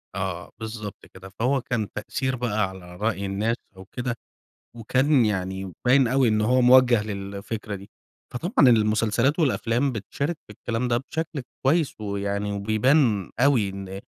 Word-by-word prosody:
آه، 95 -2 -4
بالضبط 110 -2 -7
كده. 95 +1 -13
فهو 125 +7 0
كان 115 -6 -2
تأثير 130 +4 -2
بقى 110 -5 0
على 90 -2 -11
رأي 105 0 -1
الناس 105 +4 0 0.2
أو 95 - -11
كده، 125 +3 -4 0.6
وكان 130 +3 +2
يعني 95 -2 -2 0.2
مبيّن 130 +1 +5
أوي 130 +1 +3
إن 110 -1 +2
هو 125 +4 +3
موجه 125 -3 +6
للفكرة 100 +1 -5
دي. 100 0 -11 0.4
فطبعًا 160 - +3
المسلسلات 115 +5 +2
والأفلام 130 -3 +1
بتشارك 140 +8 -3
في 105 - -11
الكلام 115 +4 -2
ده 120 -1 +2
بشكل 155 +3 -4 0.2
كويّس 155 +2 +2
ويعني 100 0 -2
وبيبان 110 - +2
أوي 125 -6 +3
إن 95 0 -7
110 Hz, 145 wpm, -25 LUFS, 100-130 Hz, 0.6 s, موجه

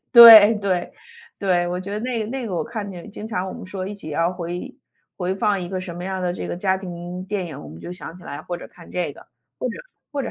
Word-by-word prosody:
对 225 -3 +12
对， 190 -4 -1 0.5
对， 180 -3 +2
我 180 +1 -2
觉 195 +2 -7
得 210 - -2
那 245 -1 -1
个 215 - -2
那 260 -2 -3
个 195 - -3
我 165 - 0
看 210 +3 -5
见 185 +1 -9
经 210 +1 -7
常 190 -4 -2
我 - - -5
们 - - -8
说 185 0 -4
一 205 - -4
起 200 -6 -8
要 165 +4 +1
回 175 0 -5 0.4
回 185 0 -1
放 205 -1 +1
一 175 - -5
个 185 0 -3
什 185 -2 -5
么 175 +1 -6
样 190 0 -2
儿 - - -4
的 180 -1 0
这 - - -5
个 - - -3
家 190 0 +1
庭 180 -1 -6
电 195 -1 -2
影， 160 -5 -7
我 - - -10
们 80 +2 -11
就 - - -7
想 180 -2 -8
起 180 - -15
来， 145 -3 -6
或 175 - -4
者 - - -10
看 170 - -16
这 170 -5 -2
个， - - -16 0.3
或 - - -1
者 - - -5 0.4
或 280 - -1
者 245 - -4
185 Hz, 305 characters per minute, -23 LUFS, 175-205 Hz, 0.5 s, 对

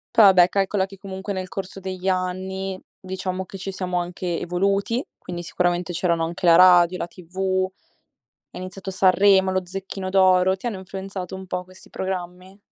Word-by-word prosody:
Poi 220 - +8
vabbè 185 -2 +7
calcola 195 0 +1
che 195 0 -13
comunque 190 +1 -6
nel 185 -1 -3
corso 195 +1 -6
degli 190 0 -3
anni 190 +1 -2 0.2
diciamo 185 0 -4
che 195 - -9
ci 195 +1 -5
siamo 185 -1 -3
anche 175 -1 -3
evoluti, 195 +6 0 0.2
quindi 175 -1 -7
sicuramente 175 +1 -1
c'erano 170 -1 +1
anche 170 +2 -5
la 165 -1 +7
radio, 180 -1 +6
la 175 - -3
TV, 185 +2 -2 0.9
è - - -9
iniziato 185 +1 -7
Sanremo, 190 0 +4
lo 185 0 -1
Zecchino 190 +1 -6
d'Oro, 185 -1 +4
ti 195 - -8
hanno 230 -4 -2
influenzato 190 -1 -6
un 190 0 -8
po' 180 0 -3
questi 185 +1 -16
programmi? 185 +1 -6
185 Hz, 170 wpm, -23 LUFS, 180-190 Hz, 0.9 s, Poi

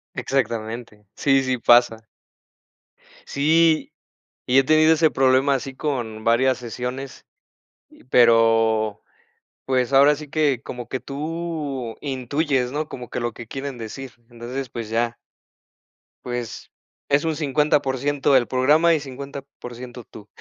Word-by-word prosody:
Exactamente. 115 -4 -3
Sí, 135 -1 +2
sí 130 -1 -1
pasa. 120 -1 +4 1.3
Sí, 160 +2 +2 0.5
y 130 +2 +4
he - - +3
tenido 155 +2 +5
ese 160 0 +3
problema 135 +1 +3
así 135 0 -5
con 120 -7 -4
varias 125 +3 +3
sesiones, 125 +3 -6 0.8
pero, 115 -3 +3 0.6
pues, 130 0 0
ahora 140 +2 +6
sí 150 0 -10
que 145 -5 +1
como 125 -1 -7
que 130 - -3
tú 150 -5 -5
intuyes, 135 -1 -1
¿no? 150 +2 -3
Como 125 -2 -8
que - - -4
lo 120 -1 -2
que 120 - -10
quieren 135 +1 -6
decir. 120 +3 -8 0.2
Entonces, 120 +2 -6
pues 115 -2 -6
ya. 115 +1 -1 1.1
Pues, 120 -2 -6 0.4
es 140 +1 +3
un 160 -1 0
50% 145 -1 +1
del 130 -3 +4
programa 150 +6 +3
y, 160 - +1
50% 130 -3 -9
tú. 105 -1 -14
130 Hz, 125 wpm, -22 LUFS, 120-145 Hz, 1.3 s, ahora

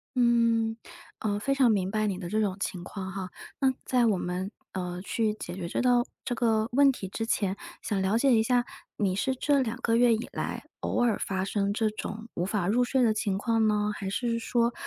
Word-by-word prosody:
嗯， 230 -2 +3 0.4
呃， 205 -2 -1
非 275 +6 0
常 260 -4 +4
明 190 -2 0
白 215 0 +1
你 190 -2 -1
的 175 -2 -6
这 215 +3 0
种 195 -2 0
情 185 -3 -3
况 190 0 -6
哈， 190 -1 -5 0.3
那 265 -1 +4
在 250 -2 +3
我 205 -4 +2
们， 180 +3 -3 0.2
呃， 180 -1 -4
去 220 0 0
解 175 - -7
决 180 -2 -5
这 - - -1
道 245 -1 +4 0.2
这 - - -1
个 225 -2 +1
问 275 +2 +6
题 205 -7 -6
之 225 +4 -3
前， 200 -4 0 0.3
想 200 -2 -1
了 195 +4 +2
解 270 +1 +4
一 225 - +5
下， 245 +2 +2 0.3
你 195 -3 +1
是 260 +7 0
这 285 +1 +2
2 235 -2 -2
个 230 -2 +2
月 240 0 +5
以 225 +3 -2
来 - - -3 0.2
偶 245 - 0
尔 230 -4 +2
发 190 -1 -1
生 200 0 0
这 215 +1 +1
种 215 +1 -6
无 175 - -2
法 195 -2 -1
入 240 +5 +3
睡 255 +1 +2
的 225 -2 +4
情 210 -3 -1
况 225 +1 +2
呢？ 210 0 +1
还 195 -2 -4
是 230 +3 -1
说， 235 +1 +1
220 Hz, 235 characters per minute, -28 LUFS, 195-240 Hz, 0.4 s, 问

